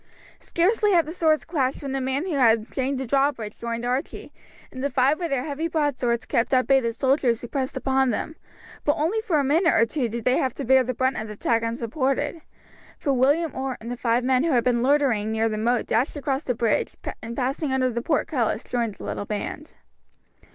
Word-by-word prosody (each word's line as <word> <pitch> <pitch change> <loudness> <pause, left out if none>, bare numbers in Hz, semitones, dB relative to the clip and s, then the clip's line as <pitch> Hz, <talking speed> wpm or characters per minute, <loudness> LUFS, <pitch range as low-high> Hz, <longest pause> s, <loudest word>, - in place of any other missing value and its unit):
Scarcely 410 +4 +1
had 335 -2 +4
the 315 - -6
swords 315 -3 +2
clashed 275 -5 -1
when 275 - -4
the 270 0 -2
man 265 +5 -1
who 365 - -3
had 230 -5 +3
chained 270 +1 -1
down 265 - -3
the - - -7
drawbridge 270 -5 0
joined 235 0 -3
Archie, 255 +3 -3 0.4
and 260 0 -7
the 280 - +1
five 270 +3 +2
with 340 -2 -2
their 270 -3 0
heavy 310 +2 -3
broadswords 280 -7 0
kept 235 +3 +1
at 255 - +3
bay 270 -1 +5
the 230 -3 -1
soldiers 260 -1 +1
who 240 - -7
pressed 265 +1 -3
upon 265 -1 +1
them; 315 +7 -3 0.5
but 290 - +3
for - - -7
only 340 +9 +1
a 300 -3 +3
minute 325 +6 +3
or 230 - +5
two 245 0 -2
did 235 0 -5
they 250 - +3
have 260 -3 -1
to - - -5
bear 260 +1 +5
the 255 0 -3
brunt 260 +2 0
of 220 - -4
the 210 - -7
attack 225 +2 0
unsupported, 260 +7 -2 0.6
for 280 - 0
William 285 +5 +2
Orr 265 -1 -3
and 230 +2 -7
the - - -2
five 240 0 +1
men 255 +1 +2
who 335 - +1
had 240 -2 +3
been 240 -2 +2
loitering 255 -6 +2
near 220 0 +1
the 215 -1 -2
moat 235 +2 +1
dashed 235 +5 0
across 275 0 -2
the 250 - -1
bridge, 230 -2 0 0.3
and 230 +1 -6
passing 270 +3 -1
under 255 -1 +1
the 235 0 -2
portcullis 250 -5 0
joined 235 -4 -2
the - - -11
little 205 - -4
band. 215 +8 -5
260 Hz, 225 wpm, -24 LUFS, 235-290 Hz, 0.6 s, bay